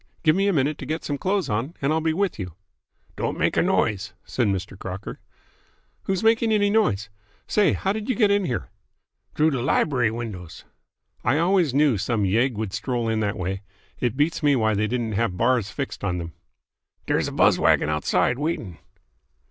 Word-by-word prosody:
Give 155 -1 +4
me 195 +1 +2
a - - +4
minute 145 0 +1
to - - -7
get 160 +1 -3
some 145 -1 -3
clothes 195 0 0
on, 115 +10 -2
and 140 +2 +1
I'll 160 - +1
be 160 0 +1
with 190 - -1
you." 90 -4 -6 0.6
"Don't - - -2
make - - +1
a - - +4
noise," 105 0 0
said 120 -4 0
Mr. 95 0 -2
Crocker. 95 0 -7 0.9
"Who's 195 +2 -1
making 225 0 +3
any 205 -1 +3
noise? 110 - +1 0.4
Say, 210 -2 +3
how 195 - 0
did 215 +2 -5
you 255 - +2
get 210 -3 +3
in 200 -1 +2
here?" 125 -8 -3 0.6
"T'roo 155 +1 +3
de 135 -4 -1
libery 125 -2 +2
windows." 110 -7 -7 0.6
"I 120 +5 +2
always 170 -4 +2
knew 140 -7 +3
some 105 0 0
yegg 115 +6 +2
would 105 -2 -4
stroll 115 +2 -2
in 110 -1 0
that 105 -2 -1
way. 95 +2 -3 0.4
It 125 0 -1
beats 150 +4 +1
me 145 -2 +4
why 110 -3 +2
they 105 +1 +1
didn't 115 -1 -2
have 105 -3 -1
bars 120 -2 +2
fixed 135 -3 -5
on 95 -3 -1
them." 85 -2 -6 0.7
"Dere's - - +1
a - - -4
buzz - - +4
wagon - - +3
outside, 75 - +1
waitin'." 115 - -3
125 Hz, 195 wpm, -24 LUFS, 105-160 Hz, 0.9 s, Give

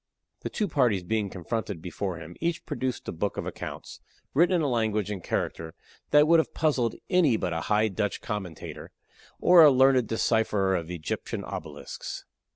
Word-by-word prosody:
The - - -5
two 210 - -1
parties 125 - +2
being 105 +2 -1
confronted 100 +1 -4
before 90 +1 -4
him, 85 +1 -10
each 170 0 -1
produced 130 -2 -3
a - - -2
book 100 +5 -3
of - - -3
accounts, - - -7 0.3
written 175 +6 +4
in 170 - +1
a - - +1
language 110 -4 0
and 95 -4 -5
character 80 0 -3 0.3
that 150 +1 +6
would 165 0 +6
have 160 - -2
puzzled 130 -8 +1 0.2
any 165 -11 +4
but 90 - -2
a 80 - -2
High 105 +1 +3
Dutch 105 0 -2
commentator 95 -6 -6 0.5
or 175 -1 +7
a 155 - +10
learned 130 -3 +4
decipherer 110 -4 +1
of 85 -2 -3
Egyptian 85 -3 -4
obelisks. - - -7
110 Hz, 170 wpm, -27 LUFS, 95-140 Hz, 0.5 s, a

